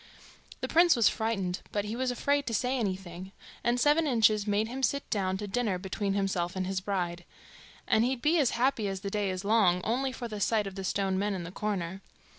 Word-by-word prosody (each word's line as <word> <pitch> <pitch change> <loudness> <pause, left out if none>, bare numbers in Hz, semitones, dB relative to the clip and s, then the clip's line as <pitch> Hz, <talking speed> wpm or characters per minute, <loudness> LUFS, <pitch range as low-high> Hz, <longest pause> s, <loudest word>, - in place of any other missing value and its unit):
The - - -1
prince 340 +1 +5
was 235 -3 +4
frightened, 195 -5 -1
but 205 -1 -1
he 215 +2 -4
was 255 +1 -1
afraid 285 +3 0
to 230 - 0
say 250 +4 0
anything, 190 -4 -4 0.3
and 240 +1 +2
Seven 300 +4 +3
Inches 215 -5 +3
made 210 +1 +1
him 255 +3 -5
sit 280 +1 0
down 190 -2 0
to 205 +1 -5
dinner 215 -3 0
between 195 +2 -2
himself 185 -3 -1
and 185 0 -1
his 190 0 -2
bride; 175 -3 -2 0.6
and 220 - +4
he'd 255 +1 0
be 320 +3 +3
as 275 -5 +3
happy 240 -4 +1
as 195 -1 -4
the 200 -1 -4
day 205 -1 0
is 185 +1 -4
long, 200 -5 +4
only 260 +4 0
for 250 -1 -6
the 215 -2 -6
sight 215 +1 +1
of 195 - -6
the 195 0 -6
stone 190 0 0
men 205 0 0
in 180 - -4
the 170 - -7
corner. 195 -2 -3
205 Hz, 225 wpm, -29 LUFS, 190-240 Hz, 0.6 s, prince